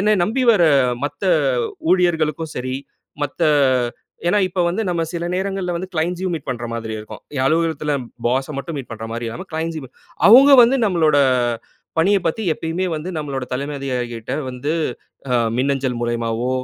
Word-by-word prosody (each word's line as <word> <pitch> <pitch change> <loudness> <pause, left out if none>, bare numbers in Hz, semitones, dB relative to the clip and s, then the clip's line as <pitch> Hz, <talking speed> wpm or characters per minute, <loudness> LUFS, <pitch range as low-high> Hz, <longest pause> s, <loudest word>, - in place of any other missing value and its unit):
என்ன 210 +2 +3
நம்பி 255 +6 0
வர 200 -6 +3 0.4
மத்த 145 +5 -4 0.7
ஊழியர்களுக்கும் 165 -4 +1
சரி 130 +1 -3 0.5
மத்த 145 +4 -5 0.9
ஏன்னா 210 - +3
இப்ப 185 0 -3
வந்து 180 +6 0
நம்ம 170 -2 0
சில 170 0 -3
நேரங்கள்ல 190 -1 -2
வந்து 185 +2 -5
க்ளைண்ட்ஸ்யும் 175 +2 -1
மீட் 155 - -6
பண்ற 120 -2 -3
மாதிரி 115 -1 -4
இருக்கும். 105 0 -9 0.2
என் 130 - +1
அலுவலகத்தில 155 -1 +1 0.3
பாஸ 130 +4 0
மட்டும் 150 +3 -5
மீட் 135 - -7
பண்றமாரி 115 +1 -5
இல்லாம 115 +1 -6
க்ளைண்ட்ஸ்யுமே 160 -4 -4 0.4
அவுங்க 265 +6 +8
வந்து 245 +3 +4
நம்மளோட 165 -7 +3 0.8
பணியப் 195 +3 +3
பத்தி 165 +7 -1
எப்பயுமே 165 +4 -2
வந்து 155 +3 -5
நம்மளோட 140 -4 -3
தலைமை 140 +3 -3
அதிகாரிகளுக்கிட்ட 125 -2 -3
வந்து 130 +5 -3 0.6
அ - - +2 0.2
மின்னஞ்சல் 135 -1 0
மூலியமாவோ! 120 0 -1
155 Hz, 150 wpm, -20 LUFS, 125-180 Hz, 0.9 s, அவுங்க